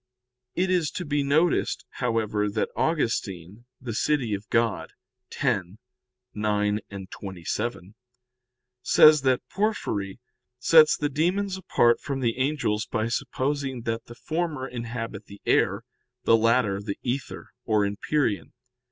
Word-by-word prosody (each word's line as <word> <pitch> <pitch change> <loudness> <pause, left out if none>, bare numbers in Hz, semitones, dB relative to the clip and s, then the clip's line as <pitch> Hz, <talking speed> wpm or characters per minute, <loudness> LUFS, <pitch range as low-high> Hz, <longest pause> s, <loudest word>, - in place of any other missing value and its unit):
It 185 +1 +1
is 175 -5 +2
to 180 - -4
be 145 -1 0
noticed, 155 +5 +1
however, 110 -4 0
that 105 +1 -1
Augustine 110 - -2 0.2
(De 120 -3 -4
Civ. 150 +6 +2 0.3
Dei 115 -8 +1 0.4
x, 95 -3 0 0.7
9, 105 0 -2 0.6
27) 95 +2 -5 0.9
says 155 +4 +7
that 130 -2 +1
Porphyry 120 - -2 0.4
sets 155 +4 +6
the 150 - 0
demons 185 +7 0
apart 120 -10 +2
from 135 0 -3
the 120 -1 -1
angels 130 -6 0
by 110 0 -1
supposing 135 +1 -2
that 115 0 -3
the 120 - -11
former 155 -3 -3
inhabit 115 -4 -6
the 100 0 -12
air, - - +2 0.4
the 115 - +5
latter 115 -3 +2
the 100 -1 -4
ether, 130 +2 -4
or 105 -2 +2
empyrean. 105 +2 -1
120 Hz, 120 wpm, -26 LUFS, 105-150 Hz, 0.9 s, says